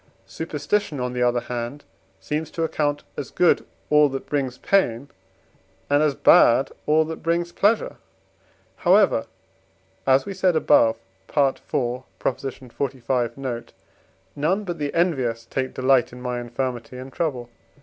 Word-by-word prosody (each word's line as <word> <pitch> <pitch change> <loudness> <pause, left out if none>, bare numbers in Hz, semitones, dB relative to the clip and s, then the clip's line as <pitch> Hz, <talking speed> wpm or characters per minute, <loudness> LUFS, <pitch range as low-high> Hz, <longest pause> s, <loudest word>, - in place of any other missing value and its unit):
Superstition, 160 +1 -2
on 125 0 -2
the 125 - -2
other 120 0 +2
hand, 120 +4 -5 0.4
seems 155 +1 -3
to 165 - -3
account 145 -2 -1
as 140 - -5
good 180 - +3 0.3
all 150 -1 +6
that 135 0 -5
brings 135 -4 -2
pain, 140 -9 +1 0.8
and 145 +1 +4
as 150 -3 +2
bad 130 +1 +5 0.2
all 155 +1 +4
that 160 +1 -6
brings 170 +1 0
pleasure. 210 +5 +1 0.8
However, 190 - +3 0.8
as 135 0 +4
we 200 - -5
said 185 -2 +2
above 115 -7 +4 0.3
(IV. 140 -3 +1
xlv. 125 -1 -3
note), 125 -4 -5 0.6
none 170 +8 0
but 175 -4 -5
the 145 -1 -2
envious 130 -10 0
take 130 +1 -3
delight 130 -1 +3
in 125 - -10
my 125 -1 -3
infirmity 120 0 -4
and 130 +1 -9
trouble. 130 -8 -3
135 Hz, 135 wpm, -23 LUFS, 125-160 Hz, 0.8 s, all